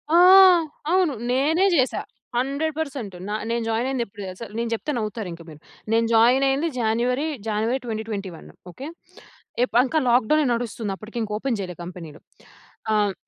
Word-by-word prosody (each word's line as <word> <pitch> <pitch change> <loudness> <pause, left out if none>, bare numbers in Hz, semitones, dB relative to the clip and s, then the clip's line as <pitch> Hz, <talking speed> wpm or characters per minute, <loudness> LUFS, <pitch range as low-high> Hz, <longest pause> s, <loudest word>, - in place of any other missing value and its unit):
ఆ! - - +7 0.7
అవును. 365 -6 +3 0.2
నేనే 310 +9 +2
జేశా. 260 -2 +1 0.4
100% 280 -4 -2
న - - -4 0.2
నేను 235 0 -1
జాయిన్ 230 +3 0
అయింది 255 -3 -1
ఎప్పుడు 200 0 -12
దెలుసా? 185 +5 -7
నేను 235 0 -1
చెప్తే 300 +7 -3
నవ్వుతారు 215 -3 -4
ఇంక 165 - -11
మీరు. 155 -1 -12 0.3
నేను 230 0 +3
జాయిన్ 245 +4 +5
అయింది 275 +5 +1
జనవరి, 245 +6 0 0.2
జనవరి 220 +5 0
2021 215 -6 -5 0.2
ఓకే. 270 - -8 0.8
ఎప్ 250 - -3
ఇంకా 310 +4 0
లాక్ 240 -2 +3
డౌనే 305 -1 +4
నడుస్తుంది 230 -3 -3
అప్పటికి. 225 +3 -6 0.2
ఓపెన్ 240 -1 -2
చేయలే 180 -3 -5
కంపెనీలు. 170 -4 -10 0.7
ఆహ్, 205 -2 +2
235 Hz, 150 wpm, -23 LUFS, 210-270 Hz, 0.8 s, ఆ